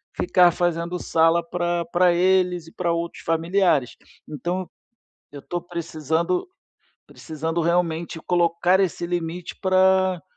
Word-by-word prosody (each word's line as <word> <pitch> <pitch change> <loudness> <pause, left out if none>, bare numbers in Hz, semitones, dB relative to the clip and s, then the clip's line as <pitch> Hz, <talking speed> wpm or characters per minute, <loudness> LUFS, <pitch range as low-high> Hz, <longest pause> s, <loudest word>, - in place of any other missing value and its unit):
ficar 180 - +4
fazendo 170 0 -1
sala 165 +1 +2
pra 175 0 -1
pra 175 0 +4
eles 180 -1 +2
e - - -13
pra 170 -2 -1
outros 170 0 -4
familiares. 165 -4 +1 0.3
Então 175 +5 -4 0.6
eu 145 -1 -10
tô 175 - -4
precisando 170 - -2 0.6
precisando 160 +2 -4
realmente 170 -1 -1
colocar 175 +1 +2
esse 180 -2 -1
limite 175 0 -4
pra 185 -1 +3
175 Hz, 115 wpm, -23 LUFS, 165-180 Hz, 0.6 s, ficar